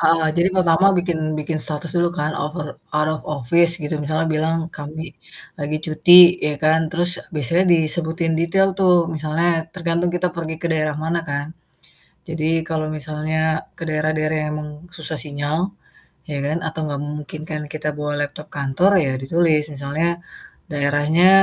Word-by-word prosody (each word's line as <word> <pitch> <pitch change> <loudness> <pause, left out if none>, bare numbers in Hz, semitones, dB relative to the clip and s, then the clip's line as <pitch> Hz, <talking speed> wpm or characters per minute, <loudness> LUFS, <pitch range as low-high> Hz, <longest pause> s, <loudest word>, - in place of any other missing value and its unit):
Eee 165 -1 +3
jadi 170 +2 +4
pertama 180 0 +4
bikin 175 -2 -1 0.2
bikin 155 +1 -2
status 150 +2 -4
dulu 175 0 +3
kan 150 +1 0
out 150 +2 -3
of 150 - -3 0.3
out 150 0 +2
of 155 - -4
office 155 +4 +3
gitu, 150 +1 -2
misalnya 155 +2 0
bilang, 160 +2 +1 0.2
"Kami 150 +2 -6 0.6
lagi 145 +1 -1
cuti," 175 +3 +7
ya 150 - 0
kan. 155 +1 +4
Terus 175 0 +1 0.2
biasanya 155 +5 +2
disebutin 165 0 0
detail 170 +4 +3
tuh, 185 -2 +5 0.2
misalnya 160 +2 0
tergantung 170 -1 0
kita 180 +1 0
pergi 160 -1 -3
ke - - 0
daerah 155 -2 0
mana 165 +1 0
kan. 145 0 -2 0.8
Jadi 160 -1 -2 0.2
kalau 160 -2 -1
misalnya 155 +1 -3 0.4
ke - - -6
daerah-daerah 155 0 0
yang 150 - -3
memang 150 - -6 0.3
susah 160 -1 -4
sinyal, 145 +1 -2 0.7
ya 145 - -3
kan 150 +3 0
atau 160 0 -5
gak 140 -1 -3
memungkinkan 150 +1 -6
kita 155 -1 -4
bawa 150 0 -2
laptop 145 +1 -5
kantor, 145 +7 +2
ya 135 - 0
ditulis 160 +2 +2
misalnya, 140 +4 -1 0.6
"Daerahnya, 145 +4 +3
155 Hz, 155 wpm, -21 LUFS, 150-170 Hz, 0.8 s, cuti